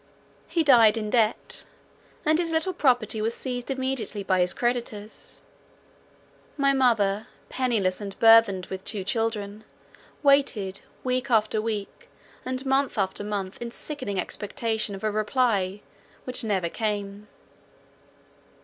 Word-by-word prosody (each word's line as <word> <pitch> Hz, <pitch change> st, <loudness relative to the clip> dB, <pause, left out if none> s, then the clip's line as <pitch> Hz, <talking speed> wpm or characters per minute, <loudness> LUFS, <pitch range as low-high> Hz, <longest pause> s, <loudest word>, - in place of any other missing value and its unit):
He 335 Hz, -, +1 dB
died 230 Hz, -6 st, +6 dB
in 215 Hz, -1 st, -3 dB
debt, 225 Hz, -2 st, +1 dB, 0.6 s
and 310 Hz, +1 st, +3 dB
his 340 Hz, -1 st, 0 dB
little 325 Hz, +3 st, +1 dB
property 245 Hz, -, +1 dB
was 225 Hz, +2 st, 0 dB
seized 250 Hz, -1 st, -4 dB
immediately 260 Hz, -6 st, -2 dB
by 190 Hz, -1 st, +1 dB
his 180 Hz, 0 st, +2 dB
creditors. 235 Hz, -3 st, -4 dB, 1.1 s
My 275 Hz, -1 st, +3 dB
mother, 220 Hz, -5 st, +2 dB, 0.2 s
pennyless 220 Hz, -8 st, 0 dB
and 200 Hz, -1 st, -7 dB
burthened 225 Hz, -5 st, +6 dB
with 190 Hz, 0 st, -7 dB
two 200 Hz, -1 st, -2 dB
children, 215 Hz, 0 st, -2 dB, 0.6 s
waited 240 Hz, -9 st, +2 dB, 0.2 s
week 255 Hz, +1 st, -1 dB
after 215 Hz, -2 st, +2 dB
week, 215 Hz, -2 st, -5 dB, 0.3 s
and 255 Hz, +1 st, -4 dB
month 270 Hz, -1 st, +1 dB
after 195 Hz, 0 st, +2 dB
month, 200 Hz, -1 st, -4 dB
in 235 Hz, -, -4 dB
sickening 235 Hz, -7 st, -4 dB
expectation 215 Hz, +2 st, -2 dB
of 195 Hz, -, -10 dB
a 215 Hz, -, +1 dB
reply, 210 Hz, -3 st, 0 dB, 0.4 s
which 255 Hz, -1 st, 0 dB
never 195 Hz, -6 st, 0 dB
came. 205 Hz, +1 st, -3 dB
220 Hz, 125 wpm, -26 LUFS, 205-255 Hz, 1.1 s, died